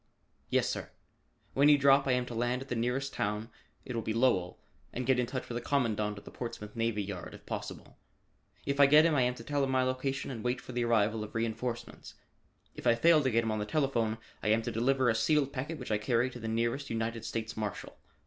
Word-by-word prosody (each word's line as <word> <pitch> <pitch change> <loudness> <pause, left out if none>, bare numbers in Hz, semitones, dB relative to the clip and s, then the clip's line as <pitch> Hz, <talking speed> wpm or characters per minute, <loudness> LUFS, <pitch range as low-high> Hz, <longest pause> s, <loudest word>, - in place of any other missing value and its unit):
"Yes, - - +2
sir. - - -4 0.6
When 140 +2 +5
you 145 - +7
drop, 140 0 +5
I 130 - +3
am 125 0 +1
to 120 - -7
land 120 +2 -1
at 135 - -18
the 125 - -1
nearest 125 +4 -1
town 105 +3 -2 0.3
it 125 - -5
will 115 - -1
be 110 0 -3
Lowell 115 -8 +2 0.3
and 125 - -4
get 130 0 +3
in 125 - +1
touch 130 +1 -4
with 120 - -5
the 120 - -2
Commandant 110 -6 0
of 100 - -11
the - - -10
Portsmouth 115 -3 -7
Navy 115 -2 0
Yard 95 -3 -7
if - - -15
possible. - - -7 0.7
If 140 0 -1
I 140 - +8
get 150 +3 +7
him, 165 - +3
I 140 - +3
am 125 0 +1
to 115 - -10
tell 145 +3 0
him 135 - 0
my 130 -1 +2
location 130 +1 -2
and 115 -4 -6
wait 125 +1 0
for - - -10
the 120 -1 -1
arrival 110 -1 +2
of 105 - -10
reenforcements. 115 +1 -4 0.6
If - - -5
I 120 - +6
fail 160 +5 +5
to 130 - +1
get 115 -1 +2
him 110 - -1
on 110 - -1
the - - -1
telephone, 120 -6 0 0.2
I - - -3
am 110 +1 +3
to - - -3
deliver 130 +3 +2
a 115 - +4
sealed 140 +4 +2
packet 145 +5 -4
which 125 -5 -6
I 105 - +2
carry 120 +3 +1
to 125 - -9
the 115 - -5
nearest 115 +5 -1
United 115 0 -2
States 115 0 -4
Marshal. 105 -3 -5
120 Hz, 245 wpm, -31 LUFS, 115-135 Hz, 0.7 s, I